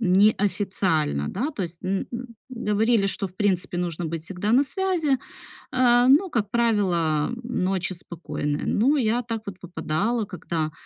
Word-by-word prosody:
неофициально, 190 - +2
да, 285 +5 -2
то 225 -10 -4
есть, 170 -1 -6
м, 190 +1 -1 0.4
говорили, 220 -2 +2
что, 195 0 -2
в 180 - -23
принципе, 185 -3 0
нужно 175 -1 -2
быть 160 0 -4
всегда 195 +4 -2
на 270 +4 +5
связи, 355 -2 0 0.6
э, 245 -1 +4
но, 295 +9 +5
как 210 -8 -1
правило, 185 -9 +1
ночи 190 -6 -1
спокойные. 155 -4 -4
Ну, 270 +8 +3
я 240 -2 +2
так 225 -2 -4
вот 190 -2 -7
попадала, 195 +6 -1
когда, 165 -4 -3
200 Hz, 145 wpm, -24 LUFS, 175-235 Hz, 0.6 s, на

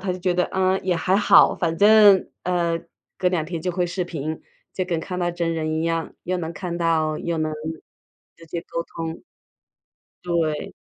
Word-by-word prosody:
她 185 -1 -2
就 180 - -6
觉 180 -1 0
得， 180 - +2
嗯， 190 0 +2
也 185 - +1
还 185 +3 +2
好， 210 - +6
反 165 -2 -1
正， 205 -2 +7 0.2
呃， 170 -2 0 0.4
隔 180 - +2
两 175 -4 -1
天 170 -1 -4
就 180 - -1
会 180 0 0
视 180 +2 -2
频， 155 -2 -5 0.3
就 185 - -2
跟 170 -2 -1
看 180 +2 -5
到 175 - +1
真 170 -1 -2
人 155 -1 -2
一 160 - -1
样， 165 -1 -1
又 185 - -1
能 165 -1 -4
看 175 -1 -5
到 160 -2 +1
又 170 -1 -2
能 155 0 -1 0.8
直 165 - -15
接 170 +2 -4
沟 170 - -4
通。 165 0 -6 1.0
对。 165 -3 -1
170 Hz, 205 characters per minute, -23 LUFS, 165-180 Hz, 1.0 s, 正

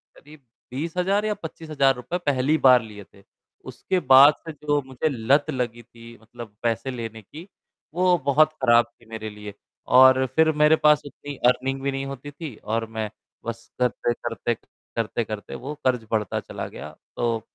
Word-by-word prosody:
करीब 150 -2 -17 0.3
20,000 180 +9 -1
या 215 - +1
25,000 155 -4 0
रुपए 125 +8 -4
पहली 145 +2 +2
बार 125 -3 +6
लिए 105 -2 -10
थे, 100 +1 -22 0.4
उसके 185 - -2
बाद 135 0 +7
से 160 - -4
जो 145 0 -1
मुझे 130 +3 -2
लत 140 +4 +1
लगी 120 -3 -3
थी 115 0 -15
मतलब 115 -2 -11
पैसे 115 +3 -1
लेने 115 -3 -6
की, 155 - -12 0.5
वो 180 +1 +3
बहुत 155 +2 +4
खराब 120 -2 +5 0.2
थी - - -19
मेरे 110 -1 -6
लिए। 105 -1 -9 0.3
और 130 +1 +6
फ़िर 160 0 +5
मेरे 150 +1 +6
पास 150 -1 +4
उतनी 145 0 -9
अर्निंग 135 +2 0
भी 140 0 -1
नहीं 135 0 -4
होती 140 +1 -7
थी 145 -4 -8
और 115 +1 -1
मैं 110 -1 -4 0.4
बस 115 0 -6
करते-करते 120 -2 -1 0.4
करते-करते 110 -2 -3
वो 140 +3 -6
क़र्ज़ 125 -3 +1
बढ़ता 105 -3 0
चला - - -7
गया। 75 +2 -10 0.2
तो 115 -2 -1
130 Hz, 165 wpm, -24 LUFS, 115-145 Hz, 0.5 s, बाद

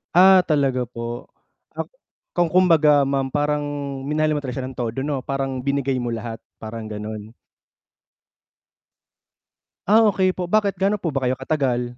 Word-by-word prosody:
Ah 185 0 +7
talaga 135 -5 +1
po, 120 0 -7 0.4
ak - - -5 0.5
kung 175 -2 +2
kumbaga 155 -6 +5
ma'am 135 -1 -1
parang 150 0 0 0.4
minahal 155 +2 0
mo 145 - -3
siya 130 0 -4
ng 130 - -9
todo 120 +1 -3
'no 140 -2 -2
parang 135 -2 -3
binigay 140 -1 0
mo 120 - -2
lahat, 115 0 -4 0.2
parang 110 0 -7
ganun. 105 +1 -6 2.6
Ah 220 +2 +6
okey 185 -1 +2
po, 180 - -2
bakit 200 0 +1
gano 200 +2 +1
po 170 - -1
ba 135 -3 -2
kayo 125 - +2
katagal? 125 -3 -1
135 Hz, 145 wpm, -22 LUFS, 125-155 Hz, 2.6 s, Ah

